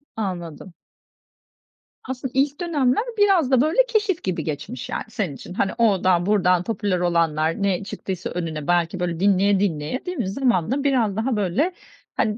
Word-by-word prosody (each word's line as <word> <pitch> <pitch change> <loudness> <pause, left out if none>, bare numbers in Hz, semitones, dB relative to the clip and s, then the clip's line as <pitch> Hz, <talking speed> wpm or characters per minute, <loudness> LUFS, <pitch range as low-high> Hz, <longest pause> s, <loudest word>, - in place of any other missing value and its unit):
Anladım. 180 -4 -5 1.3
Aslında 260 0 -5
ilk 280 +3 +1
dönemler 290 - +1
biraz 385 -9 +3
da, 255 -2 +5
böyle, 325 +12 +3
keşif 420 -6 0
gibi 185 -2 -2
geçmiş, 145 -5 -5
yani, - - -3
senin 195 -10 -3
için. 180 - -10
Hani, 190 - 0
oradan, 185 -6 +3
buradan, 185 -3 +3
popüler 200 -3 -1
olanlar, 165 0 +1
ne 195 0 +1
çıktıysa 190 -2 -5
önüne, 160 -4 -4
belki, 175 +1 +1
böyle, 170 -2 -2
dinleye 200 0 +3
dinleye, 170 - -2
değil 360 -2 -4
mi? 220 -6 -1
Zamanla 245 - 0
biraz 240 -8 +2
daha 230 +3 0
böyle, 210 - 0 0.4
hani, 215 0 0
200 Hz, 155 wpm, -23 LUFS, 175-260 Hz, 1.3 s, da